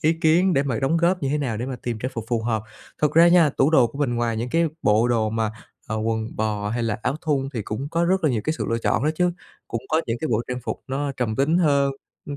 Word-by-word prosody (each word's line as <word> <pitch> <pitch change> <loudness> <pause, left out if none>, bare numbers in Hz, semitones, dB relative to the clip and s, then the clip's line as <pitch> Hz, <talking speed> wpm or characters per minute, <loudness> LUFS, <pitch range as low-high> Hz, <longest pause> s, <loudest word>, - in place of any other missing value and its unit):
ý 160 +1 +3
kiến 170 +3 +3
để 140 - +3
mà 130 -5 -2
đóng 140 +5 +1
góp 175 +1 +1
như 135 - 0
thế 150 - 0
nào 125 -7 -2
để 120 +3 -3
mà 130 -1 -4
tìm 120 -3 -3
trang 130 +3 -3
phục 115 - -4
phù 115 -2 0
hợp. 110 -2 -1 0.4
Thật 150 - +3
ra 170 +1 +7
nha, 170 -4 +5
tủ 140 - +2
đồ 135 -7 +5
của 140 - -10
mình 130 -5 0
ngoài 120 -1 -1
những 120 +3 -3
cái 165 +2 +2
bộ 110 +3 +3
đồ 110 -3 +1
mà, 110 -1 -1 0.4
à, 110 - -3
quần 110 0 -2
bò 105 -1 -1
hay 120 +2 -1
là 115 -2 -1
áo 140 - 0
thun 145 -5 0
thì 115 - -2
cũng 125 +8 -4
có 170 +2 0
rất 185 0 +1
là 155 - +4
nhiều 115 -4 0
cái 155 - +1
sự - - -1
lựa 115 - +1
chọn 115 +1 0
đó 155 - +3
chứ. 180 +2 +2 0.4
Cũng 115 - -3
có 160 +1 +2
những 115 0 -2
cái 155 - -2
bộ 115 -1 +1
trang 125 0 -3
phục - - -4
nó 140 +1 -2
trầm 115 -4 -1
tính 155 +6 +2
hơn, 140 -5 +3 0.3
ừm, 145 - -5
130 Hz, 290 wpm, -23 LUFS, 115-155 Hz, 0.4 s, ra